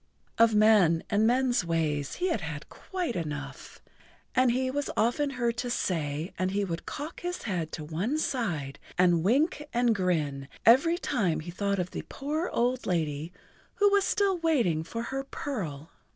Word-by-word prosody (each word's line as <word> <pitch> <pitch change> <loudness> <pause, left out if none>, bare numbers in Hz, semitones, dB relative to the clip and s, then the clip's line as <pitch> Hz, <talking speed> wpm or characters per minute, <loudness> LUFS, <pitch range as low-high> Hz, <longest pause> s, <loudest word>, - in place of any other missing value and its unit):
Of 230 -1 +5
men 210 -6 +5
and 215 +1 +3
men's 245 -3 +2
ways 155 -4 -1
he 365 +1 0
had 160 - -3
quite 360 - -4
enough, 150 -5 -6 0.6
he 255 0 +2
was 285 +1 -2
often 240 +7 +2
heard 240 -3 -1
to 245 - -2
say, 160 -7 -2
and 185 0 +1
he 200 +1 0
would 170 -2 -5
cock 295 +3 -6
his 355 0 -4
head 175 -7 -2
to 155 - -5
one 175 - -2
side 170 - -2 0.2
and 175 -2 +4
wink 290 - +2
and 240 -1 +3
grin 155 -8 -1 0.2
every 280 +9 +6
time 200 - 0
he 175 +3 -7
thought 200 +2 -1
of 180 -1 -2
the - - -4
poor 305 +5 -2
old 245 +2 0
lady 160 -3 -1 0.4
who 410 -1 +4
was 400 -1 +4
still 390 -3 +1
waiting 240 - +2
for 230 +8 -5
her 270 0 -1
pearl. 170 - -5
210 Hz, 165 wpm, -28 LUFS, 165-265 Hz, 0.6 s, every